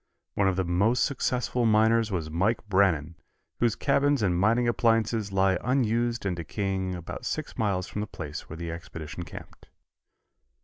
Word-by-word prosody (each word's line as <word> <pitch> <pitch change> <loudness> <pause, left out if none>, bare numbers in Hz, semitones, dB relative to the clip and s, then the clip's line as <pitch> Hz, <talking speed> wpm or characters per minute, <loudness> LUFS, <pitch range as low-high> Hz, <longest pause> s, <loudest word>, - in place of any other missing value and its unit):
One 100 - +2
of 95 - +1
the 95 - 0
most 100 +8 +2
successful 125 -3 0
miners 110 +1 +3
was 85 -5 -2
Mike 105 +7 0
Brannan, 90 -5 +2 0.4
whose 120 -3 +2
cabins 140 -2 +2
and 90 -3 +2
mining 115 +7 +3
appliances 115 -3 +1
lie 95 -1 +2
unused 120 -2 +1
and 95 -3 0
decaying 95 +2 -2
about 85 -1 -7
six - - -4
miles 100 -4 0
from 105 - -5
the 105 - -3
place - - -7
where 80 - -7
the 85 0 -4
expedition 85 -1 -7
camped. 85 - -11
100 Hz, 160 wpm, -27 LUFS, 90-115 Hz, 0.4 s, miners